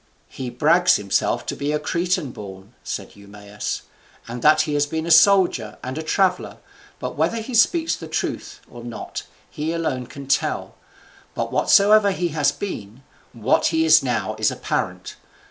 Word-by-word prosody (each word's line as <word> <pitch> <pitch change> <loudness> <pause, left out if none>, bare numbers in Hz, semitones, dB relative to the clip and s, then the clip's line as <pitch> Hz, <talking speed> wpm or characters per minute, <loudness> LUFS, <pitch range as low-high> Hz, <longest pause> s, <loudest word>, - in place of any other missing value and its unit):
"He 130 -2 -6
brags 165 +8 +3
himself 100 -1 0
to - - -4
be 145 +1 -2
a 150 - +1
Cretan 170 -2 -1
born," 100 0 -11
said - - -6
Eumaeus, 100 +1 -7 0.4
"and 120 +1 -6
that 155 +2 +5
he 155 -1 -2
has 145 0 +1
been 160 +2 -3
a 170 - -2
soldier 175 - +4
and 130 +1 -5
a 160 - -3
traveller, 180 +3 0 0.4
but - - -5
whether 230 - 0
he 230 +3 -6
speak 325 +8 +3
the - - -7
truth - - -4
or 120 -1 -12
not 120 -1 -7 0.2
he 155 +2 -4
alone 135 -7 -2
can 140 -1 -10
tell. 140 - -1 0.6
But - - -3
whatsoever 205 +1 +5
he 180 -3 -1
has 150 -2 +1
been, 125 - -7 0.3
what 115 +1 +1
he 160 -1 +1
is 160 - +6
now 115 -5 -2
is 110 - +3
apparent. - - -4
150 Hz, 165 wpm, -22 LUFS, 120-175 Hz, 0.6 s, is